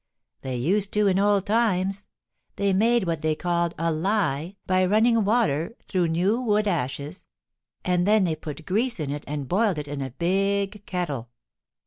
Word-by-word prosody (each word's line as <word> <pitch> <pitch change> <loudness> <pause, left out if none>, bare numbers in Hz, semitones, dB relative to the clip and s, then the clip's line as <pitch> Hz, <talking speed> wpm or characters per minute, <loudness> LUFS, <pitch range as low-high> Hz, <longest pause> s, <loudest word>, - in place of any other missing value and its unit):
They 130 -1 -4
used 190 +11 +1
to 210 0 +2
in 190 -1 +3
old 200 -1 +2
times. 200 -3 0 0.5
They 200 -1 +1
made 230 +3 +3
what 165 -2 -2
they 155 -1 +1
called 170 0 -1
a 165 0 0
lye 170 -1 -1
by 185 0 +2
running 225 +3 +3
water 200 - +1
through 180 -3 +1
new 185 +9 +1
wood 210 -3 +1
ashes, 150 -1 -3 0.6
and 180 0 +1
then 210 -1 +4
they 165 -3 0
put 155 0 -8
grease 225 +4 0
in 145 -3 -2
it 145 0 -4
and 145 -2 -4
boiled 200 - +1
it 150 -1 -4
in 145 -1 -5
a 135 - -3
big 195 - -1
kettle. 150 - -3
185 Hz, 170 wpm, -25 LUFS, 155-205 Hz, 0.6 s, then